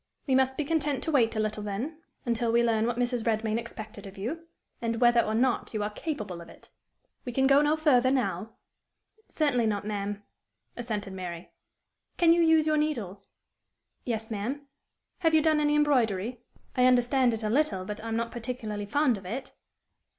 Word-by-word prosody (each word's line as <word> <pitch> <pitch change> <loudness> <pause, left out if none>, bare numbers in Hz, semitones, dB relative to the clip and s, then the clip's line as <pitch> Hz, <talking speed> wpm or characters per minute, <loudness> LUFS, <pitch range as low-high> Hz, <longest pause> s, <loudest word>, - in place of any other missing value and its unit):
We 270 - 0
must 265 0 +3
be 300 - -1
content 290 -3 0
to 320 - -1
wait 235 -6 +3
a - - -1
little, 215 0 -1
then 220 +11 -4 0.3
until 235 -1 0
we 235 +1 +4
learn 225 -1 +2
what 240 -1 -1
Mrs. 245 -1 0
Redmain 220 0 0
expected 220 -2 -8
of 195 - -12
you, 315 +12 -5 0.3
and 230 -1 -1
whether 240 -1 +5
or 215 -1 -2
not 240 -1 0
you 210 - 0
are 210 - -2
capable 210 - -5
of 170 - -12
it. - - -16 0.5
We 245 - -5
can 265 +2 +2
go 275 +1 +6
no 300 +1 +3
further 260 -5 +4
now." 245 -4 -1 0.7
"Certainly 250 -7 +1
not, 205 -1 -1
ma'am," 205 -1 -3 0.5
assented 215 -5 -4
Mary. 180 -2 -7 0.7
"Can 335 -2 +6
you 340 - +3
use 320 -1 +5
your 310 0 +2
needle?" 230 -11 -2 0.8
"Yes, 225 -2 -3
ma'am." 245 +8 -3 0.5
"Have 325 -3 +3
you 315 - +5
done 310 -1 +3
any 295 0 +2
embroidery?" 245 -6 +1 0.3
"I 250 - +4
understand 250 -1 +3
it 220 - -7
a 215 - 0
little, 250 -9 +1
but 210 +2 -6
I - - -5
am 225 - -2
not 230 0 -2
particularly 225 -4 -5
fond 255 -2 +2
of 190 - -16
it." 260 +7 -5
235 Hz, 185 wpm, -28 LUFS, 215-280 Hz, 0.8 s, go